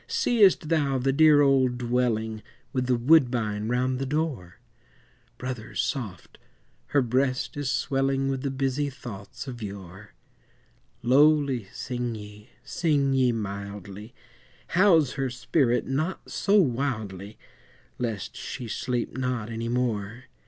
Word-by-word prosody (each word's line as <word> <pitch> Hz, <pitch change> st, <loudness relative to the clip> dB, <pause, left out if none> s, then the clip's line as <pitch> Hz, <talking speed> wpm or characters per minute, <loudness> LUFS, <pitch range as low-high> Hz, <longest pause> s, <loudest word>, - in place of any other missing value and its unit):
Seest 235 Hz, -, +3 dB
thou 145 Hz, -5 st, +2 dB
the 135 Hz, +1 st, +1 dB
dear 155 Hz, 0 st, +6 dB
old 130 Hz, -3 st, +3 dB
dwelling 120 Hz, -3 st, -1 dB, 0.3 s
With 130 Hz, -2 st, -1 dB
the 125 Hz, -, +3 dB
woodbine 120 Hz, -6 st, +3 dB
round 125 Hz, +2 st, 0 dB
the 135 Hz, -, -2 dB
door? 140 Hz, -, -2 dB, 0.8 s
Brothers, 125 Hz, -4 st, -6 dB
soft! 110 Hz, -, -4 dB, 0.5 s
her 140 Hz, -2 st, +2 dB
breast 130 Hz, +2 st, 0 dB
is 145 Hz, -2 st, -2 dB
swelling 135 Hz, +2 st, 0 dB
With 135 Hz, -1 st, -1 dB
the 140 Hz, -, -1 dB
busy 135 Hz, +2 st, -1 dB
thoughts 120 Hz, -1 st, -9 dB
of 120 Hz, -3 st, -7 dB
yore; 100 Hz, -1 st, -9 dB, 0.9 s
Lowly 140 Hz, -2 st, +4 dB
sing 120 Hz, -2 st, -4 dB
ye, 105 Hz, 0 st, -11 dB
sing 145 Hz, -5 st, +1 dB
ye 130 Hz, -2 st, +3 dB
mildly, 100 Hz, 0 st, -6 dB, 0.5 s
House 170 Hz, -6 st, +4 dB
her 135 Hz, -1 st, -2 dB
spirit 125 Hz, 0 st, +1 dB
not 155 Hz, +8 st, -3 dB
so 205 Hz, +1 st, +3 dB
wildly, 110 Hz, -, -2 dB, 0.6 s
Lest 115 Hz, -6 st, -3 dB
she 120 Hz, -, -6 dB
sleep 120 Hz, +2 st, -2 dB
not 125 Hz, -4 st, -2 dB
any 115 Hz, +1 st, -3 dB
more. 120 Hz, -2 st, -2 dB
125 Hz, 125 wpm, -26 LUFS, 110-140 Hz, 0.9 s, dear